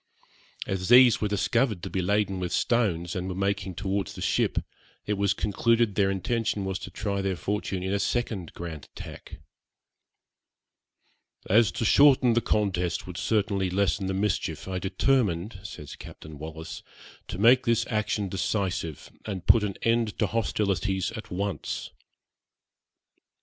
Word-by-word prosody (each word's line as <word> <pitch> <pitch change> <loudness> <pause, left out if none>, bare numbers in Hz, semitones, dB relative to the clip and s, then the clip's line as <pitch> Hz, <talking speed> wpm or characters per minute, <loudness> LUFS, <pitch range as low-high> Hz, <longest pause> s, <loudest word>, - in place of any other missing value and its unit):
As 95 0 -3
these 125 -1 +7
were 105 - +1
discovered 105 0 0
to 95 - -4
be 95 - 0
laden 100 0 +1
with 90 -1 -3
stones, 90 -8 +1
and 90 0 -3
were 90 - -4
making 100 -1 -1
towards 95 0 -2
the - - -8
ship, - - +1 0.5
it 105 - 0
was 100 0 +1
concluded 115 +2 +1
their 95 0 +2
intention 105 +1 -1
was 95 0 -2
to - - -7
try 100 +2 -2
their 95 -1 -1
fortune 95 0 -3
in 95 +1 -1
a 100 - +1
second 100 -4 -2
grand 80 -4 -7
attack. - - -10 2.1
'As 110 +2 +4
to 120 -2 -2
shorten 130 -2 +6
the 120 - +2
contest 95 -6 0
would 90 - -8
certainly 100 +1 0
lessen 100 +1 0
the 95 - -1
mischief, 100 -1 -1
I 95 -1 -2
determined,' 95 -1 0
says 75 -7 -9
Captain 75 -2 -11
Wallis, 80 +1 -7 0.5
'to - - -5
make 125 +5 +5
this 115 -1 +3
action 105 -1 -1
decisive, 95 -4 -2 0.2
and 95 -4 -4
put 115 - +6
an 100 -2 -2
end 115 -2 +1
to 105 - +2
hostilities 100 -3 0
at 110 -1 -8
once.' 100 +1 -3
100 Hz, 150 wpm, -27 LUFS, 95-110 Hz, 2.1 s, these